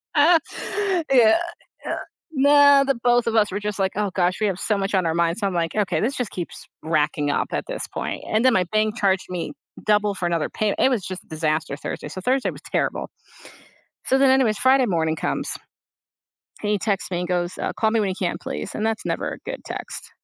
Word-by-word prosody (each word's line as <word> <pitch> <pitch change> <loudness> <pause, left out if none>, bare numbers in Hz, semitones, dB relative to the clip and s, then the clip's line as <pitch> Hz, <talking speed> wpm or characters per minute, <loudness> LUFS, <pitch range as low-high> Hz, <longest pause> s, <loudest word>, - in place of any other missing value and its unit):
Uh 320 +3 +6 0.7
Yeah 235 -2 +6 0.5
yeah - - -2 0.4
nah, 285 0 +6
the 275 0 +1
both 240 -1 +3
of 230 - 0
us 210 -3 +3
were 200 - -2
just 210 -1 -3
like, 190 -1 +1
"Oh 205 0 0
gosh, 180 0 +1
we 215 - +3
have 190 -2 -2
so 215 - +1
much 195 0 -1
on 185 -2 +2
our 165 - +1
mind." 170 +1 +1
So 215 - -2
I'm 195 - 0
like, 165 -2 -1
"Okay, 210 -3 +1
this 250 +6 0
just 245 -5 -3
keeps 175 -2 -6 0.2
racking 150 -2 0
up 145 - 0
at - - -2
this - - -4
point." - - -5
And 215 +2 +1
then 260 - +6
my 185 -4 +2
bank 215 +1 +1
charged 195 -4 +1
me 180 - -4 0.3
double 210 -1 +2
for 180 - -3
another 170 -2 0
payme 215 -2 -1
It 260 - +5
was 240 -7 0
just 185 -1 -7
disaster 155 -2 -1
Thursday. - - -5
So 185 - -7
Thursday 255 +6 +1
was - - -12
terrible. - - -1 1.0
So 265 - +3
then 270 0 +5
anyways, 260 -5 +3
Friday 260 +2 +4
morning 160 -6 0
comes - - -2 1.1
and 210 - -1
he 210 - +2
texts 200 -1 -1
me 175 -1 -1
and 180 - -3
goes, 175 0 -1
"Uh, - - -2
call 220 - +1
me 225 0 +2
when 200 -2 0
you - - -2
can 180 -3 -1
please." 75 +1 -5
And 215 - -1
that's 225 -1 -2
never - - -2
a - - -8
good - - -6
text. - - -7
205 Hz, 225 wpm, -23 LUFS, 180-240 Hz, 1.1 s, Uh